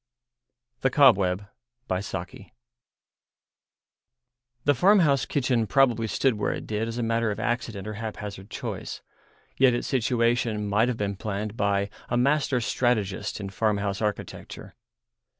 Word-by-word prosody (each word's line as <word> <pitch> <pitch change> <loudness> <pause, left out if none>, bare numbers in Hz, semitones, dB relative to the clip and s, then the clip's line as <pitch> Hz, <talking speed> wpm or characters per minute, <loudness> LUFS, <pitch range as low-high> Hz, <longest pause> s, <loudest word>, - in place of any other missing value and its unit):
THE 135 - +2
COBWEB 100 -9 +4 0.4
The 95 0 -4 2.2
farmhouse 150 - +4
kitchen 125 -5 +1
probably 120 -1 +3
stood 130 +4 +2
where 105 - 0
it - - -6
did 110 +1 -2
as 115 +1 -5
a 120 - -1
matter 115 0 +1
of 105 - -3
accident 115 -4 -2
or 110 - -4
haphazard 105 -2 -6
choice; - - -6 0.5
yet 130 -2 +5
its 120 - -3
situation 115 -3 +1
might 105 +4 +3
have 125 -2 -1
been 100 -2 -2
planned 105 +1 -4
by 100 -1 0 0.2
a 120 - +1
master 135 0 +2
strategist 105 -5 0
in 100 -1 -5
farmhouse 100 -1 0
architecture. 105 -2 -5
110 Hz, 125 wpm, -26 LUFS, 100-125 Hz, 2.2 s, yet